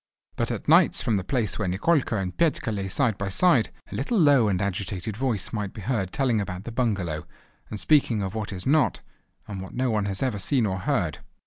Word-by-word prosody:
But - - -1
at - - -4
nights - - +5
from 110 -3 +1
the 95 - -2
place 105 -2 -1
where 105 - -1
Nikolka 120 - +1
and 95 -2 -3
Petka 160 -8 +1
lay 100 -2 -3
side 100 +2 +1
by 100 -1 -2
side, 130 - +3 0.2
a - - -7
little 150 - -1
low 145 - +5
and 95 -3 +1
agitated 100 0 -3
voice 120 -5 -2
might 105 -3 -3
be 105 - -8
heard 100 -4 -1
telling 125 -6 +1
about 95 -1 -5
the 120 - -6
bungalow, 100 -10 -1 0.4
and 105 - -5
speaking 125 -8 +3
of 95 - -4
what 110 -2 -4
is 90 -2 -5
not, 145 0 +2 0.5
and 100 -2 -6
what 95 - -9
no 125 -1 0
one 105 -2 0
has 100 +4 -2
ever 120 -6 -1
seen 120 +5 +2
or 95 -2 -2
heard. - - -1
105 Hz, 220 wpm, -25 LUFS, 95-125 Hz, 0.5 s, nights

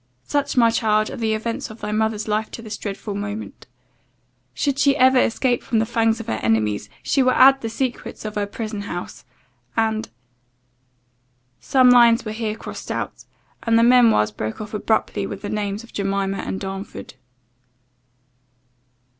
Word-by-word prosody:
"Such, 285 - -1
my 230 -2 +5
child, 215 -2 +1
are - - -6
the 220 -2 0
events 230 +1 -4
of 220 +1 -11
thy 210 - -4
mother's 220 0 -1
life 215 +1 -1
to 230 - -7
this 215 -1 -5
dreadful 205 0 -5
moment 205 +2 -6 0.8
Should 280 -1 -1
she 280 0 +4
ever 260 0 +5
escape 245 +1 +1
from 230 - -1
the 220 - +2
fangs 225 0 +1
of 230 - -6
her 110 - -2
enemies, 105 -2 0
she 275 - +2
will 255 0 +3
add 270 +1 +6
the 225 - -3
secrets 245 -1 -4
of 215 - -4
her 205 -1 -2
prison 215 0 -5
house 175 -5 -7 0.5
and 220 0 0 0.7
" 125 0 -44
Some 255 -2 +4
lines 235 -1 +6
were 215 - -3
here 215 -1 -3
crossed - - -8
out, - - -4 0.4
and 230 -1 +2
the 230 - +5
memoirs 235 - +5
broke 110 +1 -5
off 215 0 -7
abruptly 215 +1 0
with - - -7
the 205 - -4
names 210 0 -3
of 235 - -16
Jemima 195 0 -1
and 190 - -4
Darnford. 195 0 -7
220 Hz, 170 wpm, -22 LUFS, 200-230 Hz, 0.8 s, add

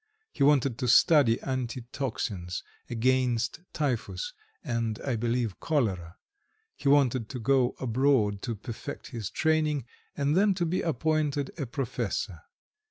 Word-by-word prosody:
He - - -9
wanted 140 -4 +4
to 125 - -1
study 125 -1 +5
anti 130 -2 -3
toxins 100 -9 -3 0.3
against 125 +2 +1
typhus, 150 - -2 0.3
and, 115 -6 -2
I 130 -3 0
believe, 115 -2 -1
cholera; 100 - -1 0.6
he 140 - 0
wanted 130 -5 +3
to 130 - -5
go 130 +1 +2
abroad 120 -5 +2
to 115 - -3
perfect 120 +6 -7
his 115 -6 -4
training, 155 -4 +1 0.3
and 145 +1 +1
then 200 +1 +4
to 175 -1 0
be 175 +3 0
appointed 155 -3 0
a 140 -6 -4
professor. 130 -1 -3
130 Hz, 130 wpm, -28 LUFS, 115-145 Hz, 0.6 s, study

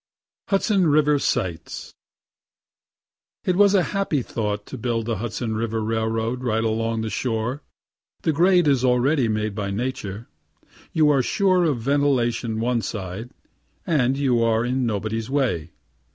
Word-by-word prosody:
HUDSON 195 -2 +2
RIVER 150 -1 +3
SIGHTS 85 -10 -3 1.5
It 180 - +2
was 200 +1 +5
a 185 - +4
happy 195 -9 0
thought 105 -3 -3
to 130 - -8
build 115 -1 -1
the 115 -2 -1
Hudson 115 +1 -3
river 115 0 -1
railroad 115 +2 -1
right 110 -2 0
along 115 0 -1
the 110 - -3
shore. 120 +5 -2 0.6
The 160 - +2
grade 175 +2 +4
is 135 -3 +3
already 125 +1 +3
made 110 -1 -1
by 100 -1 -3
nature; 105 -1 -4 0.6
you 155 -2 +4
are 140 -2 +3
sure 185 - +2
of 140 -7 0
ventilation 125 -5 +1
one 120 0 0
side 100 +2 -5 0.6
and 135 -5 +2
you 130 -4 +2
are 115 0 +2
in 125 0 0
nobody's 110 +1 -2
way. 130 - 0
120 Hz, 140 wpm, -23 LUFS, 110-145 Hz, 1.5 s, was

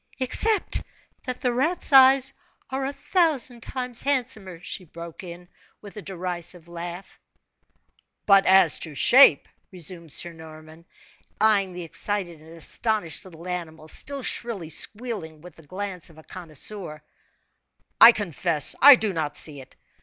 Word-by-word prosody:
"Except 420 - +1 0.4
that 255 -2 -5
the 250 -3 0
rat's 305 +5 -1
eyes 265 0 +6 0.4
are 265 0 -2
a - - -3
thousand 285 -8 0
times 250 -1 -5
handsomer," 245 -10 -2
she 185 - -5
broke 170 0 -11
in, 175 0 -10 0.3
with 205 0 -12
a 210 - -7
derisive 180 -2 -6
laugh. 175 +2 -9 1.1
"But 195 -1 +5
as 190 +1 +5
to 155 -3 -6
shape," 240 - +6 0.2
resumed 170 -2 -5
Sir 170 +3 0
Norman, 160 +1 -14 0.5
eyeing 205 -3 +2
the 180 0 -7
excited 175 0 -4
and 160 - -16
astonished 195 0 -1
little 170 -1 -12
animal, 160 -3 -6
still 275 - -5
shrilly 215 -11 -3
squealing, 205 -6 -3
with 180 0 -13
the - - -14
glance 185 -1 -6
of 160 - -19
a 160 - -15
connoisseur, 165 -1 -6 1.0
"I 230 - +11
confess 175 -7 0
I 285 0 +10
do 215 -5 -1
not 150 -3 -3
see 145 -3 -1
it! 130 - -17
185 Hz, 140 wpm, -24 LUFS, 165-240 Hz, 1.1 s, I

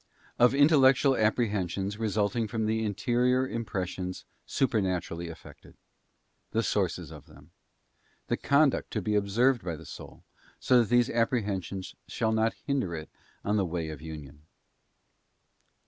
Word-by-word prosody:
Of 125 +2 +5
Intellectual 140 -2 +5
Apprehensions 105 -3 0
resulting 110 +1 0
from 110 0 -2
the 110 +1 0
Interior 125 +5 +1
Impressions 95 -6 -4 0.2
supernaturally 95 -8 -1
effected. 85 -1 -13 0.8
The 115 +1 +1
sources 90 -7 -1
of 75 -3 -12
them. 75 +4 -17 0.7
The - - 0
conduct 140 0 +2
to 110 - -1
be 105 - 0
observed 110 +5 +2
by 85 -3 -3
the 80 +1 -12
soul, - - -11 0.4
so 125 - +4
that 115 - +1
these 120 +1 +3
apprehensions 100 -5 -1
shall 110 -1 -1
not 110 0 +1
hinder 130 - -1
it 80 -1 -8 0.3
on 105 +1 +1
the 100 - +2
Way 85 -1 -3
of 75 -2 -8
Union. 75 -2 -10
105 Hz, 130 wpm, -28 LUFS, 90-120 Hz, 0.8 s, Of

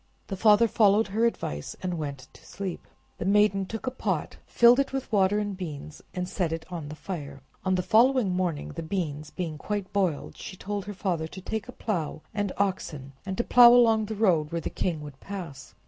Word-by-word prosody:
The 195 - -2
father 215 +3 +5
followed 210 -1 +3
her 225 +4 +2
advice, 75 - -4
and 180 -1 -1
went 140 -5 -5
to - - -17
sleep; 190 -2 -6 0.3
the - - -2
maiden 200 0 +3
took 225 +4 -6
a 255 - -1
pot, 255 - -2
filled 240 +2 +6
it 275 - +1
with 270 -1 -4
water 200 -1 +3
and 205 -1 -2
beans, 155 -4 -7
and 180 0 -2
set 180 -3 -1
it 165 0 -4
on 165 -4 -5
the 150 - -7
fire. 145 -6 -7 0.2
On 185 -1 +2
the 180 - 0
following 240 -1 +4
morning, 180 -5 -1
the 165 - -6
beans 155 -4 -3
being 160 -3 -5
quite 205 -2 -4
boiled, 185 -7 0
she 185 - -8
told 205 0 -4
her 205 -1 -6
father 175 -5 -1
to 185 - -10
take 220 +3 -4
a - - -7
plow 175 -11 -3
and 205 -2 -1
oxen, 165 -8 -2
and 190 - -3
to 235 - +1
plow 240 -1 +8
along 225 -3 +5
the 220 +1 -5
road 175 -8 +2
where 170 - -1
the - - -4
king 165 -4 -2
would 145 -2 -10
pass. 180 -9 -8
190 Hz, 210 wpm, -27 LUFS, 160-210 Hz, 0.3 s, plow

